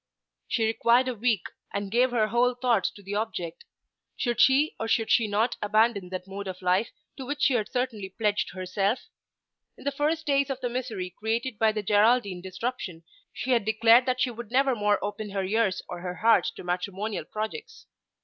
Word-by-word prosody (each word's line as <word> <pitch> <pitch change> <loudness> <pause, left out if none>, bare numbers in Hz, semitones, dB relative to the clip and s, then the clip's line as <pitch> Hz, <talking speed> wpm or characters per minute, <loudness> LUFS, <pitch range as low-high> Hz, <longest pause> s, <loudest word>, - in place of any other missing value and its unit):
She 225 - +1
required 235 +3 +3
a - - -1
week, 225 -4 0 0.3
and 200 -1 -4
gave 245 +3 +3
her 225 -3 +1
whole 245 +2 +2
thoughts 240 -5 +1
to 205 - -15
the 195 +1 -6
object. 205 -6 -4 0.5
Should 240 -2 0
she 275 +4 +4
or 225 - -2
should 225 0 +1
she 230 -3 +4
not 215 +4 0
abandon 210 -2 +2
that 185 0 -5
mode 195 +1 -6
of 185 0 -7
life 185 +5 +2 0.3
to 265 - -6
which 290 +1 -3
she 275 - +4
had 215 -3 0
certainly 235 -6 -2
pledged 205 -1 -1
herself? 195 +4 -1 0.7
In - - -13
the 285 - 0
first 310 +3 -1
days 280 -1 +2
of 270 -1 -3
the 245 - -2
misery 230 -7 -4
created 225 +3 -3
by 220 -1 +4
the 215 -1 -3
Geraldine 205 -2 +3
disruption 190 -2 -5 0.3
she 260 - -4
had 235 -4 +3
declared 225 +4 +5
that 255 0 0
she 250 -1 +2
would 235 -2 -8
never 265 +2 +3
more 210 -2 +2
open 205 +1 -4
her 195 -1 -2
ears 200 -1 0
or 175 - -6
her 180 0 -5
heart 225 +6 +4
to - - -9
matrimonial 190 +4 -3
projects. 435 - -6
220 Hz, 195 wpm, -27 LUFS, 200-245 Hz, 0.7 s, declared